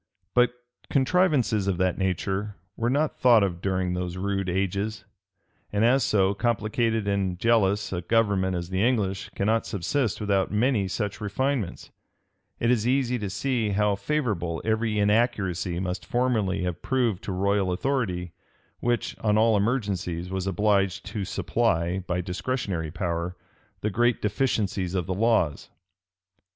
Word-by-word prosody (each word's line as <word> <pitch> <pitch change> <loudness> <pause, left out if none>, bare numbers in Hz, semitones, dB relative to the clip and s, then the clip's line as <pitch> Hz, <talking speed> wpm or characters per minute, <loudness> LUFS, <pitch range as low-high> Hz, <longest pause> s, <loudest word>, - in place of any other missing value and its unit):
But 125 0 +4 0.4
contrivances 135 - +2
of 95 -3 +1
that 95 0 0
nature 95 +2 -1 0.2
were 115 +1 0
not 145 +4 0
thought 120 -4 +6
of 90 -3 -2
during 95 -2 0
those 90 0 -3
rude 95 0 -1
ages; 100 +3 -2 0.7
and 105 +2 +2
as 130 +2 +4
so 100 -2 +2
complicated 110 0 0
and 95 -2 0
jealous 105 -2 +2
a 90 - -2
government 95 -2 +1
as 85 +1 -4
the 95 +1 0
English 105 -6 0
cannot 110 +3 +1
subsist 110 - -1
without 100 -2 +1
many 105 -1 +1
such 105 +2 -3
refinements, 110 0 -2 0.7
it 115 - +2
is 115 -2 +1
easy 125 -1 +1
to 105 -2 -3
see 115 +2 -1
how 105 +1 +2
favorable 100 - -1
every 110 -1 0
inaccuracy 100 -5 +1
must 90 0 -4
formerly 110 -7 0
have 90 -1 -3
proved 120 -8 0
to - - -3
royal 100 0 +1
authority, 90 -5 -1 0.5
which, 120 0 -1
on 105 -1 +2
all 110 0 +4
emergencies, 100 -6 -1
was 95 0 -2
obliged 100 0 +1
to 100 0 -4
supply, 95 -3 0
by 90 0 0
discretionary 90 -2 -3
power, 85 +1 -3 0.4
the 105 - -1
great 120 +4 +2
deficiency 105 -3 0
of 90 - -1
the 95 - -2
laws. 100 -7 +1
100 Hz, 140 wpm, -26 LUFS, 95-115 Hz, 0.7 s, thought